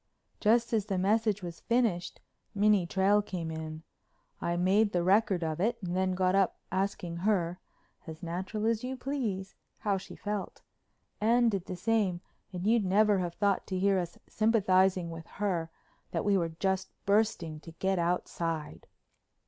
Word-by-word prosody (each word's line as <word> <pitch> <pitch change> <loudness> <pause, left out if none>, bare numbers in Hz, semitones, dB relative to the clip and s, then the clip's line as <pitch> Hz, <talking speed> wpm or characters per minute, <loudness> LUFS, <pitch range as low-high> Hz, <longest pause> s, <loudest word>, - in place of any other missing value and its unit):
Just 230 +2 +3
as 215 -2 +1
the 195 -3 -1
message 210 +1 +1
was 170 -1 -6
finished 230 -8 0 0.3
Minnie 205 -3 +3
Trail 195 +3 +3
came 175 -5 -5
in. 160 0 -6 0.6
I 170 0 -1
made 200 +4 +3
the 175 -1 +1
record 190 -1 +3
of 160 0 -2
it 230 +5 +1
and 175 0 -2
then 185 0 +1
got 185 0 +2
up 195 -2 +2
asking 185 -3 -2
her, 180 -2 0 0.5
as 160 +2 -8
natural 190 +5 -3
as 225 0 +1
you 260 +1 -4
please, 225 -8 -3 0.2
how 200 -2 0
she - - -11
felt. 205 -1 -5 0.6
Anne 235 +2 +4
did 195 -4 -2
the 185 - -5
same 195 -2 +1 0.3
and 180 0 -5
you'd 225 0 +4
never 205 +1 +3
have 175 -2 -3
thought 200 -2 +1
to 190 - -2
hear 195 0 +3
us 175 -1 -5
sympathizing 190 -5 +2
with 165 -1 -8
her 180 -5 -1 0.4
that - - -2
we 205 -1 +3
were 170 -3 +1
just 190 +3 -1 0.2
bursting 200 -6 +1
to 165 - -11
get 190 +2 0
outside. 170 -2 -2
190 Hz, 165 wpm, -30 LUFS, 175-210 Hz, 0.6 s, Anne